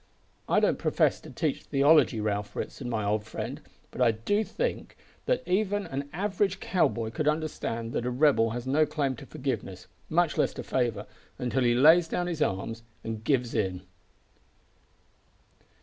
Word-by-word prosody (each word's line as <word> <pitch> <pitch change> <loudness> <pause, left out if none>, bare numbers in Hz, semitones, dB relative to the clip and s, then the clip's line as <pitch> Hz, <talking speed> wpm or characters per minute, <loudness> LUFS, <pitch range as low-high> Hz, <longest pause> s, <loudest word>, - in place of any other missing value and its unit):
I - - +4
don't - - +2
profess - - +2
to - - -11
teach - - -2
theology, 140 -4 +4
Ralph 105 -1 -2
Ritson, 125 -3 -5
my 110 -3 -1
old 105 +1 0
friend, 110 - -6 0.3
but - - -6
I 125 - +6
do 115 - 0
think 480 - -3 0.3
that - - +1
even 205 +2 +1
an 140 +1 -5
average 195 0 -1
cow 185 - +2
boy 110 -1 -4
could 150 +5 -2
understand 150 -7 -2
that 120 - -1
a - - +1
rebel 125 -3 +3
has 120 +2 -5
no 150 +4 +3
claim 145 -4 -1
to - - -11
forgiveness 95 -9 -4 0.2
much 170 0 +2
less - - +1
to - - -5
favour 115 -5 -1 0.3
until 125 +1 -1
he 120 -1 +3
lays 160 +6 +6
down 175 - -1
his 170 -3 -3
arms 115 +1 -1 0.2
and 110 -1 -5
gives 125 -2 +1
in." 95 -5 -1
130 Hz, 165 wpm, -28 LUFS, 115-160 Hz, 0.3 s, I